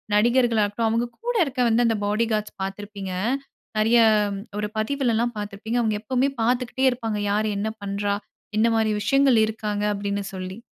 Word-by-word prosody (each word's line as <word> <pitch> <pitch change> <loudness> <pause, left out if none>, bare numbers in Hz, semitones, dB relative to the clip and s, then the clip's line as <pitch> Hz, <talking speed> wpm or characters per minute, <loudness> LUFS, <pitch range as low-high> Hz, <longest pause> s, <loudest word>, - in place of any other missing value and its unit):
நடிகர்களா 235 0 +3
இருக்கட்டும், 220 +2 -1
அவுங்க 230 +2 0 0.2
கூட 485 0 0
இருக்க 265 -3 -3 0.2
அந்த 225 -1 +2
பாடி 215 +3 +1
கார்ட்ஸ் 215 0 -3
பார்த்திருப்பீங்க. 195 -1 -6 0.7
நிறைய 225 +2 +4 0.6
ஒரு 210 - -1
பதிவுலல்லாம் 240 0 0
பார்த்திருப்பீங்க. 210 +3 -4
அவுங்க 220 -2 +1
எப்பவுமே 255 +4 +1
பார்த்துக்கிட்டே 250 +2 +1
இருப்பாங்க. 230 -4 -3
யார் 215 +1 +1
என்ன 210 +2 -1
பண்றா 200 0 -1 0.4
என்ன 220 +2 +4
மாரி 220 -1 +2
விஷயங்கள் 275 +2 +4
இருக்காங்க 210 -1 -3
அப்படின்னு 200 0 -2
சொல்லி 185 +1 -6
220 Hz, 145 wpm, -24 LUFS, 205-240 Hz, 0.7 s, நிறைய